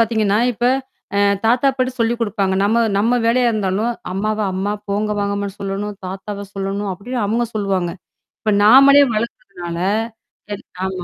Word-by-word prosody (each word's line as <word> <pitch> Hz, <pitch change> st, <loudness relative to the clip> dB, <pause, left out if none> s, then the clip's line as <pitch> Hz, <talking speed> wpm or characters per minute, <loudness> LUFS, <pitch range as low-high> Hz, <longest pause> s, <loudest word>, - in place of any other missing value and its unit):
பாத்திங்கன்னா, 220 Hz, -3 st, +2 dB
இப்போ 240 Hz, +2 st, +1 dB, 0.5 s
அ -, -, +3 dB, 0.3 s
தாத்தா, 245 Hz, +4 st, +3 dB
பாட்டி 255 Hz, 0 st, 0 dB
சொல்லிக் 230 Hz, +1 st, +1 dB
குடுப்பாங்க. 205 Hz, -3 st, 0 dB
நம்ம 220 Hz, +3 st, +2 dB, 0.2 s
நம்ம 225 Hz, +5 st, +2 dB
வேலையா 240 Hz, +1 st, +3 dB
இருந்தாலும், 215 Hz, +2 st, 0 dB, 0.2 s
அம்மாவை 215 Hz, +2 st, -1 dB
அம்மா 190 Hz, +2 st, -1 dB, 0.2 s
போங்க 210 Hz, +1 st, 0 dB
வாங்கம்மான்னு 200 Hz, 0 st, -2 dB
சொல்லணும்! 200 Hz, +1 st, -3 dB
தாத்தாவை 200 Hz, +2 st, -6 dB
சொல்லணும், 195 Hz, +1 st, -3 dB
அப்படின்னு 240 Hz, +6 st, -5 dB
அவுங்க 225 Hz, +4 st, +1 dB
சொல்லுவாங்க. 195 Hz, -4 st, -1 dB, 0.5 s
இப்போ 215 Hz, -, +1 dB
நாமளே 275 Hz, +6 st, +8 dB
வளக்குறதுனால 195 Hz, -6 st, -5 dB, 1.1 s
ஆமா, 185 Hz, -2 st, -4 dB
210 Hz, 135 wpm, -19 LUFS, 195-230 Hz, 1.1 s, நாமளே